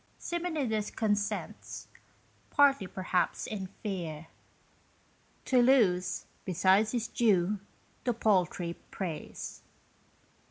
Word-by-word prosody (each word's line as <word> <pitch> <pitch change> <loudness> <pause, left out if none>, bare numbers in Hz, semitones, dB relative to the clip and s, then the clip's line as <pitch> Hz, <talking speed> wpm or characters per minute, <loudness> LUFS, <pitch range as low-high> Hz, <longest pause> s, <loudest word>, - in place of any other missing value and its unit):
Simonides 300 -12 -1
consents, 205 -2 -2 0.6
partly, 275 -8 +4
perhaps, 185 -1 0
in 195 -3 -4 0.2
fear 170 -7 -4 1.2
To 255 -2 +4
lose, 215 -9 +3 0.2
besides 190 +4 +3
his 230 -2 0
due, 205 -4 +2 0.4
the 245 - +1
paltry 180 -5 +1
praise. 175 -6 -5
205 Hz, 80 wpm, -31 LUFS, 185-240 Hz, 1.2 s, partly